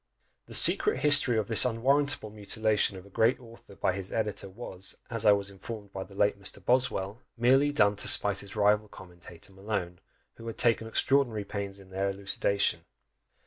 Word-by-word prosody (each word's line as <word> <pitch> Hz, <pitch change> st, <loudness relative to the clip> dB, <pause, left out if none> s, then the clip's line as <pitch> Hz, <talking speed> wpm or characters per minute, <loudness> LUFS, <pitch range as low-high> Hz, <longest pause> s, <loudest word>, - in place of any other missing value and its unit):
The -, -, -6 dB
secret 425 Hz, -, +6 dB
history 140 Hz, -5 st, +5 dB
of 105 Hz, -2 st, -2 dB
this 115 Hz, -, +7 dB
unwarrantable 130 Hz, 0 st, -1 dB
mutilation 105 Hz, -1 st, -1 dB
of 95 Hz, -, -13 dB
a 100 Hz, -, -18 dB
great 115 Hz, +7 st, +1 dB
author 115 Hz, -4 st, -16 dB
by 95 Hz, -, -1 dB
his 95 Hz, 0 st, -8 dB
editor 105 Hz, -3 st, -4 dB
was, 95 Hz, -2 st, -6 dB
as 115 Hz, -2 st, -2 dB
I -, -, +7 dB
was 100 Hz, 0 st, -3 dB
informed 100 Hz, +1 st, -10 dB
by 95 Hz, -, -6 dB
the 95 Hz, +1 st, -17 dB
late 100 Hz, 0 st, 0 dB
Mr. 95 Hz, -, -6 dB
Boswell, 120 Hz, -4 st, -1 dB, 0.2 s
merely 135 Hz, +5 st, +2 dB
done 105 Hz, -8 st, +2 dB
to 105 Hz, -, -5 dB
spite 100 Hz, -1 st, +4 dB
his 100 Hz, +1 st, -11 dB
rival 105 Hz, 0 st, +1 dB
commentator 90 Hz, -1 st, -13 dB
Malone, 95 Hz, -3 st, -5 dB, 0.4 s
who 115 Hz, -, -11 dB
had 115 Hz, -, -7 dB
taken 115 Hz, -2 st, +1 dB
extraordinary 115 Hz, -3 st, 0 dB
pains 100 Hz, -1 st, -6 dB
in 95 Hz, -1 st, -18 dB
their 95 Hz, +1 st, -2 dB
elucidation. 100 Hz, 0 st, -1 dB
105 Hz, 180 wpm, -27 LUFS, 100-115 Hz, 0.4 s, this